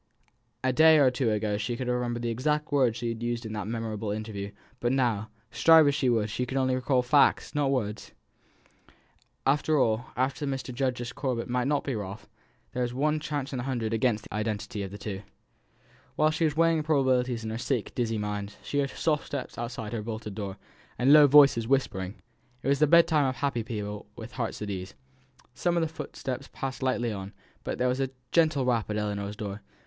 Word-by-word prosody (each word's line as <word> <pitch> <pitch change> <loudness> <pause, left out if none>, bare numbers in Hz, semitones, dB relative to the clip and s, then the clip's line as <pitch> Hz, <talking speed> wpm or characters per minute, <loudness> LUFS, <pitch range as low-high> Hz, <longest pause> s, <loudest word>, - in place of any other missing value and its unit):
A 130 0 +2
day 160 +3 +7
or 135 -4 +5
two 125 -2 0
ago 105 -1 0
she 115 +3 -2
could 130 - -3
have 125 0 0
remembered 120 -1 -2
the 120 - 0
exact 150 +6 -1
words 130 -5 +3
she 120 0 -2
had 115 0 -5
used 120 0 -2
in 110 - -5
that 105 -1 -4
memorable 110 -2 -3
interview; 105 -1 -4 0.3
but 120 - 0
now, 115 -5 +1 0.2
strive 160 -2 +6
as 145 - +3
she 140 -3 +1
would, 110 -3 +2
she 125 - -1
could 130 - -3
only 130 -1 +2
recall 130 0 +1
facts, 140 +3 +3
not 145 -2 +1
words. 110 -6 -2 1.3
After 150 +3 +2
all, 115 -2 +1
the 135 +3 -1
Mr. 135 -2 -3
Justice 125 -1 -2
Corbet 125 -4 -2
might 125 +1 0
not 145 0 +1
be 135 - -2
Ralph. 100 -1 -6 0.4
There 125 - -3
was 120 0 -2
one 150 +3 +1
chance 145 -2 -4
in 130 - -2
a - - -1
hundred 120 -4 -2
against 115 -2 +1
the - - -11
identity 105 -1 -3
of 100 - -4
the 100 - -8
two. 100 -2 -5 0.9
While 155 0 +3
she 160 +1 +1
was 155 -1 -1
weighing 165 -1 +4
probabilities 130 -6 +1
in 110 - -4
her 115 - -4
sick 120 -2 -2
dizzy 115 -2 -1
mind, 105 -1 -4
she 145 - -1
heard 140 -1 +1
soft 150 +1 -1
steps 140 -2 -5
outside 115 -2 -5
her 115 - -2
bolted 110 -1 -5
door, 100 -2 -5 0.4
and 135 +4 +5
low 150 -1 +9
voices 140 -5 +6
whispering. 105 -8 0 0.5
It 135 - 0
was 140 - +3
the 155 - +5
bedtime 160 -2 +5
of 130 - -1
happy 130 -1 -1
people 105 -2 -5
with 115 +1 -9
hearts 120 -4 -4
at 105 - -4
ease. 95 0 -6 0.6
Some 175 +6 0
of - - +3
the 160 - +1
footsteps 140 -4 -6
passed 135 -1 -5
lightly 125 -3 0
on; 95 0 -7 0.3
but - - -3
there 125 - +1
was 125 +1 0
a 135 -1 0 0.2
gentle 155 -5 +3
rap 115 -4 +1
at 105 - -1
Ellinor's 105 -1 -3
door. 105 -2 -6
125 Hz, 210 wpm, -28 LUFS, 110-140 Hz, 1.3 s, low